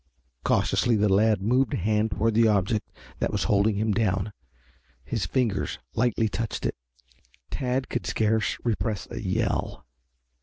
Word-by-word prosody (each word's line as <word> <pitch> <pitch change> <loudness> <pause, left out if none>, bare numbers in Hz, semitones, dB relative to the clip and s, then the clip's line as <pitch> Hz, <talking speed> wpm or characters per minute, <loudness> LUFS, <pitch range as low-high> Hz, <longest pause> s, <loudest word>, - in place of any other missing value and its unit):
Cautiously 120 -2 +2
the 105 -2 +3
lad 105 -1 +3
moved 125 +3 +2
a - - -1
hand 105 +3 +1
toward 110 +2 0
the 115 +1 +5
object 105 +1 +1 0.3
that - - 0
was - - 0
holding 100 +1 +2
him 110 +2 0
down. 100 -1 0 0.7
His 85 - -2
fingers 110 -3 0 0.2
lightly 115 -1 +1
touched 115 +1 -3
it. - - 0 0.8
Tad 130 0 -1
could 120 - -3
scarce 110 0 +1
repress 110 -2 -1
a - - -5
yell. 95 - -1
110 Hz, 145 wpm, -26 LUFS, 100-115 Hz, 0.8 s, the